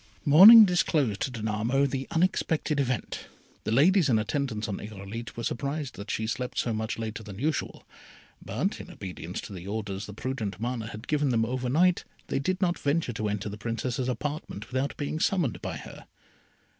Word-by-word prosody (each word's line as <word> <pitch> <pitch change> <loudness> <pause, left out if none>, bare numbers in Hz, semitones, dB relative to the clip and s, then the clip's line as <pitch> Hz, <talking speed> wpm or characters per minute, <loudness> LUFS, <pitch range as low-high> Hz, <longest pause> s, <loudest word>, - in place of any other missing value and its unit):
Morning 205 +10 +11
disclosed 150 - +1
to - - 0
Danamo 115 +4 0
the 135 -1 -4
unexpected 165 -3 +1
event. 130 -3 -2 0.4
The - - -1
ladies 160 - +4
in 115 - +4
attendance 110 0 -2
on 100 - -4
Irolite 105 +2 -7
were 115 - -4
surprised 140 +2 -3
that 100 +2 -9
she 110 - -1
slept 125 +3 -3
so 115 - 0
much 110 0 -3
later 110 0 -4
than 100 -3 -9
usual; 145 +5 -2 0.6
but, - - -2
in - - -11
obedience 90 -1 -7
to - - -9
the 90 0 -8
orders 100 -1 -4
the 105 - -8
prudent 110 -5 -4
Mana 120 -1 -3
had 110 +2 -9
given 150 -2 +1
them 115 -2 +2
over 125 +1 -2
night, 180 +6 +3 0.3
they - - 0
did 185 +7 -1
not 175 -2 +1
venture 145 -3 0
to 105 -1 -2
enter 105 0 -3
the 105 +1 -6
Princess's 120 +3 -2
apartment 135 -4 -4
without 130 +2 -1
being 145 +2 -3
summoned 170 - 0
by - - -4
her. - - -11
125 Hz, 180 wpm, -28 LUFS, 110-145 Hz, 0.6 s, Morning